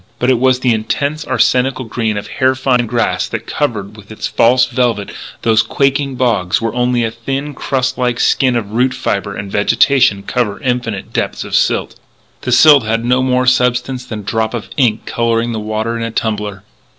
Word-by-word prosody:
But 125 Hz, +2 st, +2 dB
it 125 Hz, -, +2 dB
was 130 Hz, 0 st, +2 dB
the 125 Hz, -2 st, +3 dB
intense, 140 Hz, +7 st, -2 dB
arsenical 130 Hz, +1 st, +1 dB
green 110 Hz, -2 st, -2 dB
of 105 Hz, -, -4 dB
hair 130 Hz, 0 st, +1 dB
fine 125 Hz, -2 st, +1 dB
grass 120 Hz, +1 st, 0 dB
that -, -, -5 dB
covers 105 Hz, -8 st, -3 dB
with 105 Hz, 0 st, -14 dB
its 110 Hz, -, -5 dB
false 125 Hz, +2 st, +3 dB
velvet 120 Hz, -4 st, -1 dB, 0.3 s
those 110 Hz, -1 st, +4 dB
quaking 140 Hz, +1 st, 0 dB
bogs 110 Hz, -8 st, +1 dB
where 115 Hz, -1 st, -2 dB
only 125 Hz, 0 st, +1 dB
a 115 Hz, -, -1 dB
thin, 135 Hz, +5 st, -4 dB
crust 130 Hz, -1 st, -2 dB
like 125 Hz, -1 st, 0 dB
skin 130 Hz, -2 st, +2 dB
of 105 Hz, -4 st, -3 dB
root 125 Hz, +3 st, +1 dB
fibre 100 Hz, -4 st, -2 dB
and 100 Hz, 0 st, -6 dB
vegetation 115 Hz, 0 st, +3 dB
cover 110 Hz, -1 st, -2 dB
infinite 125 Hz, -5 st, -2 dB
depths -, -, -2 dB
of -, -, -9 dB
silt. -, -, 0 dB, 0.4 s
The 130 Hz, -, -3 dB
silt 145 Hz, +3 st, +7 dB
had 115 Hz, +1 st, -1 dB
no 125 Hz, +1 st, +2 dB
more 125 Hz, 0 st, +1 dB
substance 125 Hz, 0 st, +1 dB
than 110 Hz, -4 st, -6 dB
a -, -, -14 dB
drop 110 Hz, +3 st, -1 dB
of 115 Hz, -, -6 dB
ink 115 Hz, -6 st, +1 dB
colouring 115 Hz, 0 st, 0 dB
the 110 Hz, -, -3 dB
water 110 Hz, +2 st, -2 dB
in 115 Hz, -, -4 dB
a 115 Hz, -, -2 dB
tumbler. 105 Hz, -3 st, -3 dB
120 Hz, 190 wpm, -15 LUFS, 110-130 Hz, 0.4 s, silt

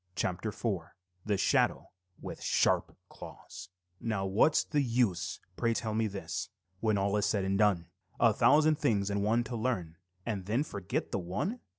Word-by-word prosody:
CHAPTER 90 Hz, +6 st, -1 dB
IV 100 Hz, -6 st, -3 dB, 0.4 s
THE 105 Hz, -2 st, +2 dB
SHADOW 95 Hz, -, +1 dB, 0.3 s
WITH -, -, -7 dB
SHARP -, -, +1 dB
CLAWS -, -, -11 dB, 0.3 s
Now 105 Hz, -4 st, -1 dB
what's 100 Hz, +11 st, +3 dB
the 150 Hz, -2 st, 0 dB
use, 115 Hz, -8 st, 0 dB, 0.2 s
pray 115 Hz, -1 st, +1 dB
tell 110 Hz, -1 st, -2 dB
me 110 Hz, 0 st, +1 dB
this, 100 Hz, -1 st, -4 dB, 0.3 s
When 110 Hz, -1 st, +1 dB
all 100 Hz, +1 st, +1 dB
is 105 Hz, -, +1 dB
said 100 Hz, -3 st, 0 dB
and 95 Hz, 0 st, 0 dB
done; 100 Hz, -4 st, +3 dB, 0.3 s
A -, -, +5 dB
thousand 155 Hz, 0 st, +4 dB
things 105 Hz, -9 st, +1 dB
and 100 Hz, 0 st, 0 dB
one 115 Hz, +4 st, +2 dB
to 120 Hz, +1 st, -5 dB
learn 105 Hz, -9 st, -2 dB, 0.3 s
And 100 Hz, -5 st, -3 dB
then 115 Hz, +7 st, +1 dB
forget 100 Hz, -10 st, -4 dB
the -, -, -1 dB
one? 105 Hz, -, -3 dB
105 Hz, 170 wpm, -31 LUFS, 95-115 Hz, 0.4 s, A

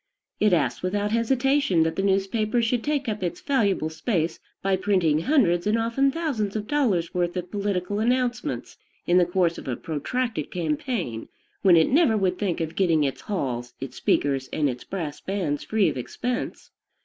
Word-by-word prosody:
It 210 Hz, -, +4 dB
asks 165 Hz, -5 st, +1 dB
without 205 Hz, +3 st, -1 dB
hesitation 250 Hz, -, +2 dB
that 160 Hz, 0 st, -1 dB
the -, -, 0 dB
newspaper 200 Hz, +4 st, +1 dB
should 230 Hz, +1 st, 0 dB
take 290 Hz, -2 st, -1 dB
up 210 Hz, -2 st, -2 dB
its 175 Hz, -2 st, -2 dB
valuable 205 Hz, -, +1 dB
space 165 Hz, 0 st, -1 dB, 0.2 s
by 195 Hz, 0 st, +2 dB
printing 185 Hz, -6 st, +2 dB
hundreds 185 Hz, -, +2 dB
and 215 Hz, +2 st, +3 dB
often 230 Hz, +5 st, +2 dB
thousands 270 Hz, -10 st, -2 dB
of 210 Hz, -1 st, -2 dB
dollars' 215 Hz, -, +1 dB
worth 175 Hz, 0 st, -1 dB
of 180 Hz, 0 st, -5 dB
political 200 Hz, -1 st, -1 dB
announcements 245 Hz, +1 st, -1 dB, 0.3 s
in 175 Hz, +1 st, +4 dB
the 175 Hz, -, +3 dB
course 175 Hz, -2 st, +1 dB
of -, -, -11 dB
a 125 Hz, -, -1 dB
protracted 185 Hz, -, -3 dB
campaign, 185 Hz, -, -2 dB, 0.3 s
when 185 Hz, -4 st, +6 dB
it 160 Hz, -, +4 dB
never 275 Hz, -6 st, +4 dB
would 185 Hz, -2 st, 0 dB
think 185 Hz, -5 st, -1 dB
of 160 Hz, 0 st, -3 dB
getting 165 Hz, -5 st, +3 dB
its 135 Hz, -2 st, -2 dB
halls, 125 Hz, -, -3 dB
its 130 Hz, -1 st, -7 dB
speakers, 135 Hz, -2 st, +1 dB
and 150 Hz, -, +1 dB
its 125 Hz, -, -8 dB
brass 160 Hz, -7 st, -5 dB
bands, 180 Hz, -7 st, -2 dB
free 215 Hz, -4 st, +2 dB
of 150 Hz, -, -1 dB
expense. 245 Hz, -, -4 dB
195 Hz, 175 wpm, -25 LUFS, 165-230 Hz, 0.3 s, when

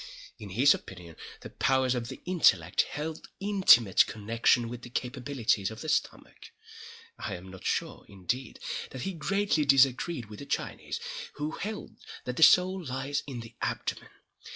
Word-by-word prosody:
In 105 Hz, -, -8 dB
his 125 Hz, +9 st, +5 dB
opinion 90 Hz, -3 st, -9 dB, 0.3 s
the -, -, -9 dB
powers 130 Hz, -1 st, +2 dB
of 120 Hz, -2 st, -3 dB
the -, -, -9 dB
intellect 180 Hz, -2 st, +3 dB
held 155 Hz, +1 st, -5 dB
intimate 190 Hz, -, +5 dB
connection 115 Hz, +2 st, +1 dB
with 120 Hz, +1 st, -7 dB
the 120 Hz, -, -10 dB
capabilities 125 Hz, -5 st, -1 dB
of 110 Hz, 0 st, -9 dB
the 155 Hz, -, -5 dB
stomach. -, -, -3 dB, 0.7 s
I -, -, -4 dB
am 90 Hz, +1 st, -10 dB
not 95 Hz, -, -12 dB
sure, -, -, -2 dB
indeed, 110 Hz, +6 st, -4 dB, 0.3 s
that 130 Hz, -, -7 dB
he 195 Hz, -, -3 dB
greatly 195 Hz, -2 st, +1 dB
disagreed 135 Hz, +1 st, +3 dB
with 105 Hz, 0 st, -11 dB
the 140 Hz, -, -9 dB
Chinese, -, -, -3 dB, 0.3 s
who 150 Hz, +1 st, -4 dB
held 210 Hz, +4 st, -6 dB, 0.3 s
that 125 Hz, -, -4 dB
the -, -, -3 dB
soul 185 Hz, +2 st, +6 dB
lies 135 Hz, 0 st, -2 dB
in 125 Hz, -4 st, -6 dB
the 115 Hz, 0 st, -11 dB
abdomen. -, -, -3 dB
130 Hz, 155 wpm, -29 LUFS, 115-155 Hz, 0.7 s, soul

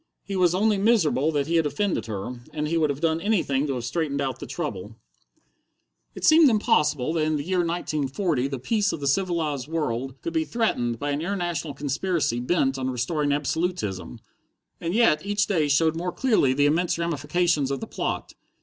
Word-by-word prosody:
He 200 Hz, -, -5 dB
was 180 Hz, -2 st, +3 dB
only 210 Hz, +1 st, +2 dB
miserable 175 Hz, -, +3 dB
that 145 Hz, -1 st, +1 dB
he 165 Hz, +2 st, +1 dB
had 160 Hz, -2 st, +2 dB
offended 200 Hz, -, -1 dB
her, 110 Hz, +4 st, -5 dB, 0.2 s
and 150 Hz, 0 st, -1 dB
he 165 Hz, -, -1 dB
would 160 Hz, -2 st, +2 dB
have 140 Hz, +1 st, -3 dB
done 165 Hz, 0 st, +1 dB
anything 165 Hz, -9 st, +1 dB
to 135 Hz, -, -1 dB
have 125 Hz, -, -4 dB
straightened 145 Hz, +1 st, -2 dB
out 130 Hz, -2 st, -2 dB
the -, -, -7 dB
trouble. 105 Hz, -, -5 dB, 1.2 s
It -, -, -3 dB
seemed 315 Hz, -2 st, +7 dB
impossible 150 Hz, -, +2 dB
that 160 Hz, -2 st, +1 dB
in 155 Hz, 0 st, +1 dB
the 145 Hz, -, -2 dB
year 185 Hz, +3 st, 0 dB
1940 155 Hz, -3 st, -1 dB
the 140 Hz, -1 st, -4 dB
peace 205 Hz, -, 0 dB
of -, -, -4 dB
the 140 Hz, -, -5 dB
civilized 150 Hz, -3 st, 0 dB
world 135 Hz, -5 st, -3 dB
could 165 Hz, -, -3 dB
be 160 Hz, -1 st, +1 dB
threatened 150 Hz, -, -1 dB
by 145 Hz, +4 st, -2 dB
an 145 Hz, +1 st, -1 dB
international 175 Hz, -4 st, -3 dB
conspiracy 145 Hz, -2 st, -1 dB
bent 135 Hz, 0 st, +1 dB
on 130 Hz, 0 st, -1 dB
restoring 145 Hz, +4 st, -1 dB
absolutism, 140 Hz, -, -2 dB, 0.6 s
and 170 Hz, +3 st, -2 dB
yet 225 Hz, -10 st, +4 dB
each 205 Hz, 0 st, +1 dB
day 160 Hz, -7 st, +1 dB
showed 160 Hz, +3 st, +3 dB
more 180 Hz, +2 st, -2 dB
clearly 215 Hz, -, +2 dB
the 145 Hz, +2 st, +2 dB
immense 165 Hz, +4 st, +1 dB
ramifications 170 Hz, -2 st, 0 dB
of 135 Hz, -1 st, -2 dB
the -, -, -5 dB
plot. -, -, -4 dB
155 Hz, 190 wpm, -25 LUFS, 135-175 Hz, 1.2 s, seemed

